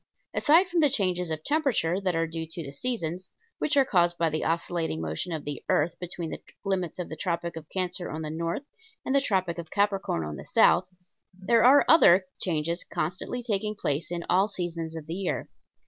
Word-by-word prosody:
Aside 335 +6 +5
from 350 -1 0
the 300 -3 +5
changes 180 -8 0
of 155 -1 -4
temperature 250 - +1
that 185 -3 0
are 165 0 +1
due 165 0 -5
to 165 +1 -7
the 140 - -7
seasons, 180 - -3 0.3
which 295 -1 +1
are 275 - +6
caused 175 -5 +2
by 165 -1 +1
the 155 - -2
oscillating 165 - -1
motion 80 - -3
of 155 -3 -4
the 145 -1 -5
earth 165 +3 +1
between 175 -2 -5
the - - -6 0.2
limits 185 -4 -1
of 180 - -4
the 160 - -6
Tropic 170 0 -2
of 160 -1 -9
Cancer 180 -1 -2
on 160 +1 -5
the 155 - -4
north 165 - -3 0.4
and 265 - 0
the 275 - +4
Tropic 185 -8 0
of 165 - -7
Capricorn 200 - 0
on 75 0 -6
the 70 - -8
south, 185 - +4 0.4
there 195 +5 +2
are 270 +4 +7
other 190 - +7 0.2
changes 170 0 0
constantly 185 +10 -3
taking 210 -2 -1
place 145 -5 -2
in 170 -1 -4
all 190 +3 +3
seasons 170 -4 -4
of 160 -2 -7
the 160 - -5
year. 185 0 -3
175 Hz, 205 wpm, -27 LUFS, 160-200 Hz, 0.4 s, are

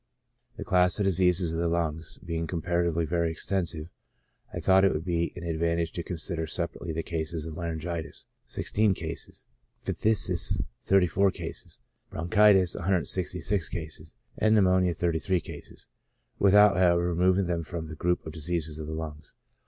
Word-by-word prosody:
The - - -5
class 90 -1 +3
Diseases 90 -3 +2
of 80 - -2
the 85 0 +1
Lungs^ 80 -1 -2
being 85 -1 -3
comparatively 85 -1 0
very 85 +1 0
extensive, 85 -1 -2 0.6
I - - -5
thought 95 0 +4
it 95 - +5
would 80 +2 -4
be 85 -1 0
an 85 - -8
advantage 85 0 -1
to 85 - -4
consider 85 -1 -3
separately 85 0 -3
the 80 +1 -3
cases 80 -1 -3
of 80 -1 -7
laryngitis 85 -1 -5 0.2
(16 105 -2 0
cases), 80 -1 -6 0.4
phthisis 95 -6 +3 0.3
(34 95 0 +3
cases), - - -7 0.3
bronchitis 95 +1 +4
(166 90 0 -1
cases), 80 -1 -7 0.2
and 110 0 +4
pneumonia 95 -3 +3
(33 85 +3 0
cases), - - -11 0.5
without, 100 0 +6
however, 85 -1 +3
removing 90 +2 +2
them 85 -1 -1
from 85 0 -6
the 80 - -8
group 90 +3 0
Diseases 80 -1 -3
of 75 - -6
the 80 - -5
Lungs. 80 -2 -7
85 Hz, 145 wpm, -27 LUFS, 80-95 Hz, 0.6 s, without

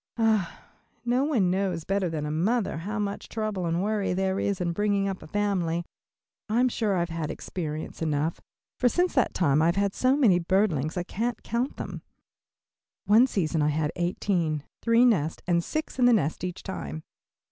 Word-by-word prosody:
Ah, 220 -6 +1 0.4
no 245 +2 +2
one 235 -12 +2
knows 185 -3 -1
better 195 -1 0
than 155 -2 -3
a 150 - -3
mother 195 +5 0
how 210 +6 -4
much 205 -1 -3
trouble 215 -5 -2
and 170 +2 0
worry 210 -2 0
there 190 +1 0
is 200 -2 -1
in 175 -1 0
bringing 200 +1 +1
up 195 -1 -4
a - - -10
family. 175 -3 0 0.6
I'm 245 +4 +3
sure 215 -4 0
I 175 - +1
have 170 - -2
had 165 -2 -3
experience 155 -3 -5
enough, 155 +1 -1 0.4
for 250 - +4
since 355 +7 +1
that 260 - +1
time 150 -4 +3
I 160 - +4
have 170 - +2
had 200 0 +1
so 260 +2 +2
many 210 -11 +5
birdlings 170 -4 +1
I 175 - 0
can't 235 +6 -3
count 240 +4 -2
them. - - -6 1.0
One 225 +5 +6
season 165 -9 0
I 150 - +3
had 150 0 0
eighteen, 175 -4 0 0.2
three 230 +1 +4
nests, 165 -10 +1
and 170 -1 +2
six 310 - -4
in 250 - +5
the 245 - +6
nest 160 -7 0
each 180 -1 -4
time. 170 -4 -5
190 Hz, 190 wpm, -27 LUFS, 165-220 Hz, 1.0 s, One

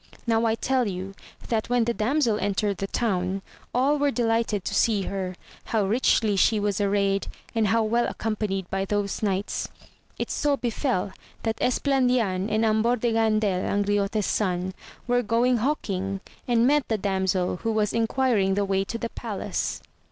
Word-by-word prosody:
Now 230 -1 +2
I 220 - +2
tell 255 +1 +1
you 190 0 -5 0.4
that 225 -1 0
when 245 -1 +3
the 235 +1 0
damsel 230 -1 +1
entered 200 -1 0
the 195 - -3
town, 190 -3 -1 0.3
all 275 +4 +2
were 290 0 +3
delighted 225 -5 0
to - - -2
see 210 -4 +2
her, 185 -1 -3 0.3
how 215 -3 +1
richly 215 -1 +2
she 215 +3 +3
was 205 -1 0
arrayed, 200 -1 +1 0.3
and 225 -2 +2
how 225 +2 +3
well 235 +2 +1
accompanied 210 -4 -2
by 195 0 0
those 200 0 -2
knights. 200 -1 -1 0.5
It - - -3
so 290 -1 +1
befell 235 -6 -1 0.3
that 225 -1 -1
Es 250 - +2
plandian 245 -8 +1
and 220 +1 +2
Ambor 220 +2 +3
de 235 0 +1
Gandel 215 -4 +2
Angriote's 205 +1 0
son, 185 -2 0 0.3
were 245 0 +2
going 240 +2 +2
hawking, 195 -7 -2 0.3
and 235 -1 +3
met 290 +1 +3
the 220 - 0
damsel, 190 -2 0
who 225 - -2
was 215 -1 +1
enquiring 225 -4 +2
the 200 0 +1
way 195 0 +1
to 230 +4 -4
the 230 0 -4
palace. - - -4
215 Hz, 165 wpm, -25 LUFS, 195-235 Hz, 0.5 s, when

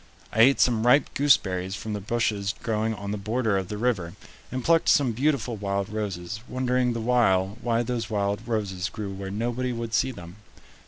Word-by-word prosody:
I 115 - +4
ate 135 +4 +6
some 120 -1 +3
ripe 135 +3 +4
gooseberries 95 -9 +2
from 110 -1 -5
the 105 - -3
bushes 105 -1 -1
growing 110 0 0
on 100 -1 -5
the 105 - -3
border 110 +1 0
of 95 -2 -1
the 105 - -5
river, 105 -8 -1 0.4
and 130 -1 -3
plucked 165 +3 +3
some 135 -5 +4
beautiful 125 -1 0
wild 100 -1 -2
roses, 105 -2 -4
wondering 125 -1 +1
the 115 - -3
while 110 -4 +2
why 120 -1 +1
those 115 -2 -3
wild 100 +1 -1
roses 100 -5 -2
grew 100 -1 -5
where 95 0 -6
nobody 120 +5 -2
would 115 -1 -5
see 130 - +2
them. 90 -4 -11
110 Hz, 190 wpm, -26 LUFS, 100-120 Hz, 0.4 s, ate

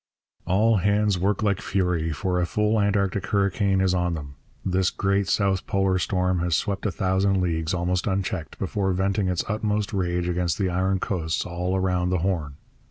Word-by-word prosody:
All 105 +4 +3
hands 100 0 +2
work 100 +4 0
like 100 -2 +1
fury, 90 -4 0
for 90 +3 -1
a 85 - 0
full 105 +3 +1
Antarctic 100 -2 0
hurricane 100 -1 +1
is 95 -1 +2
on 90 -1 0
them. 70 -3 -7 0.3
This 95 0 +2
great 100 0 0
South 100 -2 +1
Polar 95 -1 +1
storm 90 0 0
has 85 -1 +1
swept 100 +3 -1
a - - -1
thousand 95 +1 +1
leagues, 80 -3 -1
almost 90 +1 -1
unchecked, 95 -4 -2
before 95 0 -1
venting 95 +1 0
its 90 -2 -1
utmost 105 0 -1
rage 90 -2 -1
against 90 0 0
the 95 -4 0
iron 95 +2 +1
coasts 80 -5 -2
all 90 +2 -2
round 90 -1 0
the 90 - +2
Horn. 80 -7 -2
95 Hz, 175 wpm, -25 LUFS, 90-100 Hz, 0.3 s, All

